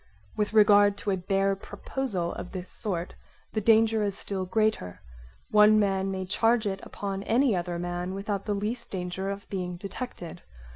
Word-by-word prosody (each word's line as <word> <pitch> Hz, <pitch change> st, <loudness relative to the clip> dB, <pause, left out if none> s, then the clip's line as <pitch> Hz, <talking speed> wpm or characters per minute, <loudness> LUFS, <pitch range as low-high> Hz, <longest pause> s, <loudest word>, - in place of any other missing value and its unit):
With 210 Hz, -1 st, 0 dB
regard 205 Hz, -1 st, +6 dB
to 200 Hz, -, -2 dB
a -, -, +2 dB
bare 195 Hz, +2 st, +1 dB
proposal 200 Hz, -2 st, -4 dB
of 180 Hz, -, -7 dB
this 185 Hz, -1 st, -5 dB
sort 180 Hz, -4 st, -3 dB, 0.4 s
the 215 Hz, -, 0 dB
danger 225 Hz, 0 st, +4 dB
is 200 Hz, -2 st, -1 dB
still 190 Hz, -2 st, -4 dB
greater: 215 Hz, -, 0 dB, 0.5 s
one 215 Hz, 0 st, +7 dB
man 195 Hz, -2 st, +1 dB
may 190 Hz, -1 st, -3 dB
charge 225 Hz, +4 st, +2 dB
it 195 Hz, -1 st, -2 dB
upon 195 Hz, -1 st, -5 dB
any 235 Hz, +2 st, +2 dB
other 175 Hz, -1 st, -2 dB
man 175 Hz, +1 st, -3 dB
without 195 Hz, 0 st, -3 dB
the 210 Hz, -, 0 dB
least 220 Hz, +4 st, -3 dB
danger 185 Hz, +1 st, -3 dB
of 200 Hz, 0 st, -6 dB
being 180 Hz, -2 st, -3 dB
detected. 195 Hz, -3 st, -7 dB
200 Hz, 165 wpm, -27 LUFS, 185-215 Hz, 0.5 s, one